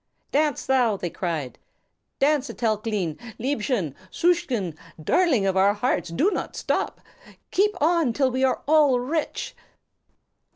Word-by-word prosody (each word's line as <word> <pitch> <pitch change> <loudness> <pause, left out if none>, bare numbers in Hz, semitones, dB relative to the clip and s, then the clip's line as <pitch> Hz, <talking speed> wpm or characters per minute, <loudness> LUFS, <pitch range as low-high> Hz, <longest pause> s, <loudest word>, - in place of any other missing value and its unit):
"Dance 295 -1 +1
thou!" 245 -6 +2
they 175 -3 -4
cried. 160 -8 -4 0.6
"Dance, 285 -1 +2
Etelklein, 215 -7 -2 0.2
liebchen, 225 - -1 0.2
susschen, 265 - 0 0.2
darling 260 - +2
of 190 -1 +1
our 195 +2 +4
hearts, 210 -6 -1
do 305 - +1
not - - -4
stop! - - -2 0.5
Keep 405 0 +2
on 325 -4 +3
till 260 +2 +1
we 260 +1 -1
are 260 - +1
all 295 -4 +5
rich." 295 +5 -3
250 Hz, 125 wpm, -24 LUFS, 200-300 Hz, 0.6 s, all